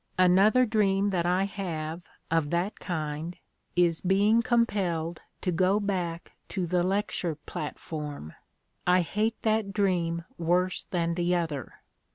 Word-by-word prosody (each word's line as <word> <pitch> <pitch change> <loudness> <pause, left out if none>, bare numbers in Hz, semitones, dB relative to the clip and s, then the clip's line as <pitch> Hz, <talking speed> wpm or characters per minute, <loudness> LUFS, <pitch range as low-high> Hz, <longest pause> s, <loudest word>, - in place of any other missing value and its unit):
"Another 195 +7 +5
dream 205 -3 +2
that 175 -2 0
I 180 +2 +2
have 170 -5 -4 0.3
of 165 -3 +2
that 175 +5 -1
kind 160 -1 -4 0.4
is 175 -2 +3
being 205 +5 +4
compelled 185 -9 0 0.2
to 180 - 0
go 185 +4 +3
back 180 -5 -2 0.2
to 185 -2 -2
the 175 +1 +1
lecture 185 -3 0
platform. 150 - -6 0.5
I 180 +1 +5
hate 210 +7 -1
that 215 -2 +1
dream 175 -5 0
worse 180 +2 +1
than 170 -2 -1
the 175 +1 +1
other. 160 -7 -3
180 Hz, 130 wpm, -28 LUFS, 165-200 Hz, 0.5 s, Another